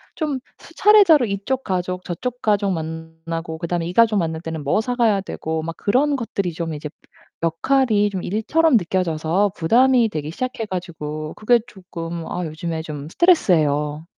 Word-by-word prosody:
좀 300 -5 -2 0.2
수차례 395 - +5
이쪽 215 +6 -3
가족 180 -1 -2
저쪽 245 +8 -4
가족 205 -2 +1
만나고 160 0 -5
그다음에 170 0 -2
이 - - -3
가족 230 +1 +4
만날 160 -3 -1
때는 160 -2 -5
뭐 145 +8 +1
사 245 +3 -2
가야 225 -5 +3
되고 160 -4 -4
막 165 +1 -5
그런 280 +7 +2
것들이 200 -8 -3
좀 165 0 -4
이제 150 0 -6 0.5
역할이 210 +5 +2
좀 190 -3 -5
일처럼 260 - +2
느껴져서 180 +1 0
부담이 240 +7 +4
되기 155 -5 -4
시작해 250 +4 -4
가지고 155 -5 -5
그게 240 +3 +3
조끔 170 -5 -7
아 180 - -2
요즘에 160 +1 -4
좀 150 -2 -7
스트레스예요. 155 - +2
180 Hz, 330 characters per minute, -21 LUFS, 160-230 Hz, 0.5 s, 수차례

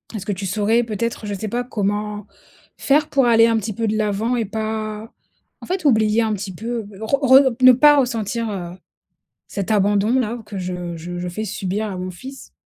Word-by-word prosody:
est-ce 205 -2 -5
que 205 - -2
tu 195 +1 -5
saurais 215 +5 +1
peut-être, 230 0 -3
je 205 - -3
sais 215 +3 -5
pas 245 +2 -2
comment 210 -3 -3 0.5
faire 290 +2 +2
pour 270 -2 +2
aller 230 -1 +6
un 230 - +2
petit 215 0 -3
peu 225 +2 -2
de 215 - 0
l'avant 215 +3 0
et 230 - -1
pas 215 +1 -4 0.5
en - - -9
fait 365 -3 -3
oublier 220 -3 +3
un 220 - 0
petit 195 -1 -5
peu, 225 +3 -4 0.2
re 220 +5 +1 0.3
re 245 - -1
p 255 - +2
ne 255 - +11
pas 295 +3 +6
ressentir, 230 -2 -1
heu, 175 -4 -5 0.8
cet 200 +1 -4
abandon 205 +4 +2
là 235 0 -3
que 205 -2 -6
je 180 -2 -5
je 175 +2 -7
je 180 - -4
fais 195 +5 -4
subir 200 +1 -3
à 195 - -5
mon 185 0 -4
fils? 265 +9 -11
215 Hz, 210 wpm, -20 LUFS, 200-235 Hz, 0.8 s, ne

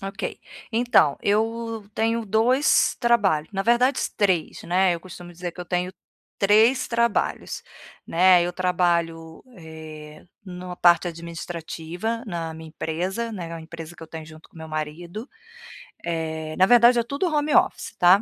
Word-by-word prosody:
Ok. 195 +1 -5 0.3
Então, 230 - +3
eu 225 +1 -1
tenho 225 +1 0
2 245 +7 +3
trabalhos, 200 -11 +2
na 195 -1 -1
verdade, 245 +4 +3 0.2
3, 185 -6 0
né, 185 +1 +3
eu - - -5
costumo 175 -1 -11
dizer 175 0 -6
que 180 - -10
eu 180 - -5
tenho 180 +1 -2 0.5
3 220 +6 +4
trabalhos, 235 -2 0 0.4
né, 180 +1 +5
eu 175 +1 -2
trabalho, 170 -3 -1
eh, 155 -2 -11 0.2
numa 180 -1 -7
parte 175 0 +4
administrativa 170 +5 -5
na 170 -4 -4
minha 160 0 -10
empresa, 185 +9 -3
né, 180 -6 -6
é - - -5
uma 165 - -7
empresa 165 0 -9
que 165 - -13
eu 160 - -10
tenho 160 -1 -8
junto 155 0 -14
com - - -22
o - - -10
meu 160 - -8
marido, 160 - -5 0.8
eh, 160 -2 -3
na 185 - +6
verdade 240 +2 +6
é - - +1
tudo 285 +8 -2
home 295 0 +1
office, - - +2
tá. 180 +3 +6
180 Hz, 160 wpm, -24 LUFS, 165-225 Hz, 0.8 s, na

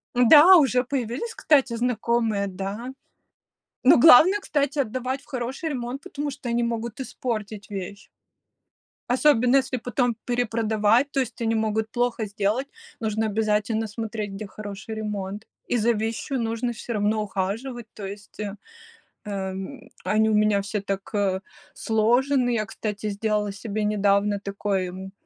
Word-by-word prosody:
Да, 300 +9 +8
уже 255 -4 +3
появились, 260 - -3
кстати, 270 -5 +3
знакомые, 230 -3 0
да. 195 +6 -5 0.9
Но 255 - +7
главное, 330 +8 +8
кстати, 290 -6 -1
отдавать 255 +2 -2
в - - -22
хороший 265 +4 -4
ремонт, 255 0 -4
потому 290 0 -4
что 250 - -8
они 235 0 +1
могут 235 +1 -3
испортить 215 -5 -5
вещь. 200 0 -7 1.0
Особенно 250 -1 +4
если 260 -1 0
потом 245 0 0
перепродавать, 230 +1 +1
то 275 - 0
есть 245 -2 -3
они 225 0 +1
могут 220 0 0
плохо 245 -2 0
сделать. 210 +6 -1 0.3
Нужно 220 0 -1
обязательно 215 +1 0
смотреть, 215 -1 -5
где 200 +1 -6
хороший 210 +2 -7
ремонт, 210 -1 -5 0.2
и 245 - +1
за 235 +1 +3
вещью 225 +5 -2
нужно 230 +2 -1
всё 235 +1 -6
равно 215 0 +1
ухаживать. 220 +5 -4
То 205 - -8
есть, 200 +2 -10
э, 205 -1 -4 0.7
э, 210 - -5 0.2
м, 195 +8 -8 0.2
они 220 +1 +3
у 220 - +1
меня 210 -1 +3
все 200 +1 -3
так, 195 -1 -4
э, 195 -2 0 0.3
сложены. 245 +4 +2
Я, 225 -3 0
кстати, 210 -1 -4
сделала 210 0 -1
себе 210 +1 -3
недавно 205 0 +2
такой, 200 -1 -2
м, 190 +1 -8
220 Hz, 145 wpm, -24 LUFS, 205-245 Hz, 1.0 s, Да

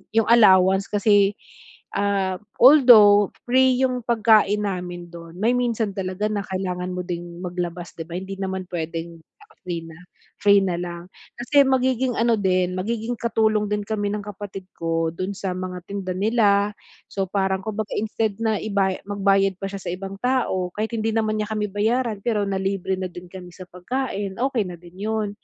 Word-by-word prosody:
yung 225 -1 +3
allowance 190 -4 +5
kasi, 205 -1 +3 0.6
ah, 195 -2 0 0.2
although 230 -7 +8 0.2
free 255 +1 +3
yung 255 -1 +1
pagkain 215 -3 +3
namin 175 -3 -5
dun, 170 -1 -11
may 225 +4 +2
minsan 235 -4 0
talaga 190 +2 -2
na 210 - -1
kailangan 185 -1 -3
mo 180 - -3
ding 175 -1 -6
maglabas, 175 -1 -4
'di 165 - -4
ba, 170 - -7
hindi 190 +1 -6
naman 190 -1 -3
puwedeng 165 0 -5
dahil 420 - -24
free 170 -2 -3
na, 165 0 -12 0.4
free 200 -1 +6
na 185 -2 -1
lang. 175 -1 -6 0.3
Kasi 280 +4 +3
magiging 260 -1 +1
ano 235 0 +3
din, 185 -2 +1
magiging 225 +5 -2
katulong 220 -2 +1
din 210 0 -1
kami 205 -1 -2
ng 205 0 -3
kapatid 200 -1 -8
ko 165 -1 -1
dun 185 +3 -4
sa 190 -2 -3
mga 185 0 -5
tinda 195 -1 -4
nila 205 0 +2 0.4
so, 195 -1 -3
parang 190 -1 0
kumbaga 215 -1 -4
instead 220 0 -1
na 220 -2 +1
ibay 195 -3 0
magbayad 195 -1 +2
pa 195 - -3
siya 200 0 -7
sa 175 - -4
ibang 195 +1 -6
tao 235 -8 0
kahit 215 +2 -3
hindi 225 0 -1
naman 215 -1 0
niya 210 0 -3
kami 210 -1 -1
bayaran, 220 +2 0
pero 220 -4 +1
nalibre 190 -1 -1
na 185 0 -3
din 175 +1 -10
kami 180 -1 -10
sa 185 0 -11
pagkain, 200 0 -4
okey 255 -3 +1
na 175 -1 -8
din 175 0 -16
'yon. 220 -1 -1
200 Hz, 175 wpm, -23 LUFS, 185-220 Hz, 0.6 s, although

